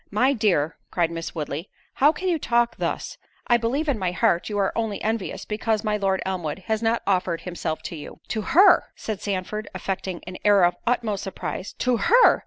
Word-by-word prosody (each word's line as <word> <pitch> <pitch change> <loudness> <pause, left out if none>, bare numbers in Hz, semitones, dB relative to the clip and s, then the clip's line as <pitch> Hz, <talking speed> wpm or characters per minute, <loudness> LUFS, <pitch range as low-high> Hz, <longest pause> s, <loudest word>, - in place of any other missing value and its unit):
"My 255 +7 +3
dear," 185 - +1
cried 170 -2 0
Miss 165 +1 -5
Woodley, 155 +2 -4 0.3
"how 290 +3 +7
can 370 +4 -4
you 340 -3 +1
talk 240 -3 +1
thus? - - -3 0.3
I 240 - +4
believe 255 +7 -1
in 270 -7 +1
my 185 -2 0
heart 180 0 +1
you 205 - -2
are 195 -1 +1
only 225 -3 -1
envious, 220 -2 -2
because 215 0 -1
my 210 -1 +1
Lord 195 -2 0
Elmwood 185 -2 -3
has 220 +1 0
not 230 +1 +1
offered 180 -3 +1
himself 170 -3 -4
to - - -5
you." 150 - -9
"To 220 - -1
her!" 360 - +6
said 215 -3 -5
Sandford, 205 +2 -3
affecting 190 -2 -4
an 185 +1 -7
air 205 -2 +5
of 175 0 +4
the 240 - -2
utmost 220 -5 -1
surprise; 195 0 -5
"to 250 -2 +1
her! 480 - +5
205 Hz, 200 wpm, -24 LUFS, 180-230 Hz, 0.3 s, how